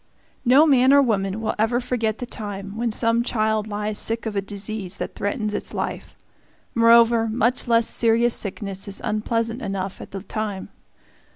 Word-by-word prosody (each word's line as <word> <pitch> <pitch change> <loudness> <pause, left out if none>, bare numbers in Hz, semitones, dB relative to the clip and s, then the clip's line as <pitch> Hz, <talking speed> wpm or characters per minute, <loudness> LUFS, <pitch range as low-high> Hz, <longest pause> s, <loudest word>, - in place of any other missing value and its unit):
No 270 +5 +6
man 265 -3 +5
or 280 - +7
woman 200 -3 -1
will 220 - -1
ever 230 +3 +2
forget 230 -3 -1
the 245 - -5
time 200 -4 -6
when 235 +1 -1
some 230 +1 +1
child 220 -3 0
lies 210 0 -3
sick 230 +1 -1
of 220 -2 -4
a 200 - +1
disease 200 -1 -5
that - - -5
threatens 210 +1 -2
its 205 - -3
life. - - -4 0.6
Moreover, 230 0 +5
much 240 +3 0
less 230 -1 +3
serious 230 +1 +3
sickness 200 -1 -3
is 200 - -3
unpleasant 230 +3 -1
enough 195 -2 -4
at - - -9
the 195 -1 -7
time. 210 -1 -4
220 Hz, 170 wpm, -23 LUFS, 205-235 Hz, 0.6 s, or